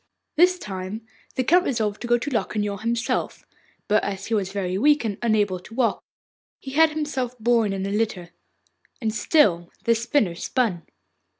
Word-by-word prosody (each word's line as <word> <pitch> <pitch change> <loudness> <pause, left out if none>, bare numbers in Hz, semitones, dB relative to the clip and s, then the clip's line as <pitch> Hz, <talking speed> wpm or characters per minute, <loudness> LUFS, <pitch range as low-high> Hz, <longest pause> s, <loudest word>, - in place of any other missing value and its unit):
This 360 +3 +5
time 200 - -6 0.3
the 260 - +1
Count 355 +7 +4
resolved 220 - -1
to 240 - -4
go 240 0 +4
to 240 - -4
Locquignol 210 -3 -1
himself; 235 +1 -2 0.4
but, 210 0 +3
as 195 -1 -4
he 230 - -3
was 195 -3 0
very 190 -2 -2
weak 290 +5 +3
and 205 -3 -3
unable 210 -5 +1
to 225 +5 -13
walk, 245 -2 +1 0.5
he 270 - -9
had 320 +3 +5
himself 270 -5 -3
borne 230 -2 +2
in 195 0 -2
a 195 - -3
litter. 200 -5 -2 0.7
And 220 -4 -1
still 190 - +3
the 230 - +4
spinner 230 - +1
spun. 185 -1 -1
225 Hz, 170 wpm, -24 LUFS, 200-250 Hz, 0.7 s, This